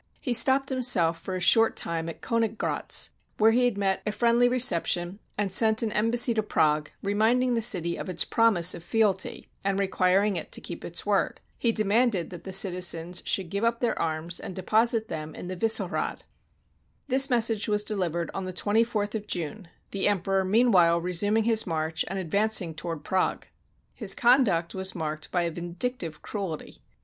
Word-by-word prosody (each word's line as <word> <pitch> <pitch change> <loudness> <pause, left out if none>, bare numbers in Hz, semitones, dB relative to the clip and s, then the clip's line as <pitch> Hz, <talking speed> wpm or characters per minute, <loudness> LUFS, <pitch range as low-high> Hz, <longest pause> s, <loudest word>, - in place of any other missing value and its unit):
He 250 - -2
stopped 270 +3 +3
himself 220 -11 +2
for 190 - -6
a - - -3
short 225 +5 +4
time 165 0 -2
at 165 - -10
Koniggratz, 230 -2 -1 0.3
where 220 +1 +4
he 245 +2 +2
had 240 -5 0
met 195 -1 -1
a 210 - -2
friendly 235 +2 +2
reception, 185 -6 +1 0.2
and 200 -2 -1
sent 220 +1 +3
an 220 - -1
embassy 235 +3 +3
to 220 - 0
Prague, 155 -7 0
re 200 +1 -1
minding 245 +4 +2
the 230 - 0
city 180 -7 +1
of - - -6
its 170 -2 +1
promise 205 -7 +3
of 165 - -9
fealty, 200 -1 0 0.2
and 195 0 -1
requiring 195 +1 +1
it 160 - -7
to - - +1
keep 175 - -8
its 170 - -4
word. 205 -1 0 0.2
He 235 - +2
demanded 215 -4 +1
that 175 -2 -10
the 190 - -6
citizens 180 -2 0
should 185 -4 +1
give 200 +2 -2
up 230 0 +1
their 240 - 0
arms, 165 +1 -2
and 185 - -8
deposit 220 +4 +1
them 155 -3 -7
in 180 - -8
the 185 - -4
Vissehrad. 225 +5 0 0.8
This 270 0 +3
message 225 -3 +2
was 210 -1 +1
delivered 175 -6 -3
on 195 - -4
the 185 - -6
24th 210 +1 0
of 210 -2 -5
June, 180 +2 -5 0.2
the 195 0 -1
Emperor 195 -1 0
meanwhile 185 -5 +3
resuming 205 +6 0
his 225 -2 +2
march, 160 -1 -2
and 195 - -5
advancing 190 -1 0
toward 160 -1 -6
Prague. 190 0 -1 0.5
His 205 -5 -1
conduct 235 -10 +2
was 190 -1 +1
marked 155 -2 -5
by 175 -1 0
a 170 - -2
vindic 175 +10 -2
tive 160 -3 -6
cruelty. 185 - -6
195 Hz, 180 wpm, -26 LUFS, 175-225 Hz, 0.8 s, short